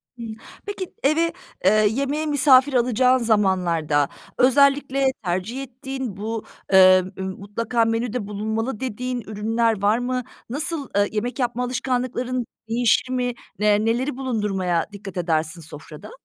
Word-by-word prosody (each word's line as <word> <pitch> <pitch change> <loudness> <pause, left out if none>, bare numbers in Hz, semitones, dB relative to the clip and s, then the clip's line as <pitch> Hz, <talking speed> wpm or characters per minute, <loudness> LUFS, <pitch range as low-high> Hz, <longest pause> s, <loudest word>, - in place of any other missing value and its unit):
Hımm, 230 -2 -7 0.3
peki 400 -3 -6
eve, 325 +4 +2 0.3
eee, 190 - +6 0.2
yemeğe 280 +6 -1
misafir 280 -2 +5
alacağın 250 +1 +3
zamanlarda, 180 - +1 0.3
özellikle 275 +1 +3 0.2
tercih 190 +9 -2
ettiğin, 265 -4 -6
bu, 220 +2 -4 0.3
eee, 185 -1 +7
mutlaka 205 +5 -2
menüde 225 -1 -2
bulunmalı 220 +3 -3
dediğin 250 0 -3
ürünler 220 +1 -1
var 210 +3 +3
mı? 250 0 -2 0.3
Nasıl, 300 +1 -1
eee, 205 0 +3
yemek 240 +5 -3
yapma 245 -1 -1
alışkanlıkların 250 0 -2 0.2
değişir 245 +3 +2
mi? 250 -1 0 0.4
Eee, 210 +1 +3
neleri 250 +4 0
bulundurmaya 205 -9 -1
dikkat 195 -2 -8
edersin 165 -1 -1
sofrada? 155 - -11
235 Hz, 120 wpm, -23 LUFS, 205-255 Hz, 0.4 s, eee